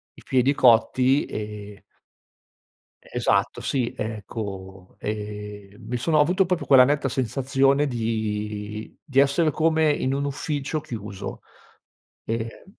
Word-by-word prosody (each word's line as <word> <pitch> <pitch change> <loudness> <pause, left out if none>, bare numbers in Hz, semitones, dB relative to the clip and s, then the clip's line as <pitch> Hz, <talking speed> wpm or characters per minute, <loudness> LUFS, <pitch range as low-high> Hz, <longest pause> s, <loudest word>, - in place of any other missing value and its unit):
i - - -15
piedi 130 +2 +2
cotti 130 +2 +4
e 105 -1 -7 1.2
Esatto - - 0
sì, 125 -4 -1
ecco, 100 -3 -6
ehm, 105 -1 -6
mi 125 - -2
sono 155 +6 +1
ho - - +6
avuto 180 +5 +3
proprio 180 -1 -1
quella 130 -2 +7
netta 140 0 +1
sensazione 135 +3 +1
di 110 -3 -3
di 135 -4 +1
essere 140 +3 +3
come 160 0 +2
in 135 -2 -1
un 140 +1 -1
ufficio 145 +1 -2
chiuso 105 -8 -7 0.8
e 115 0 -4
125 Hz, 115 wpm, -24 LUFS, 105-140 Hz, 1.2 s, quella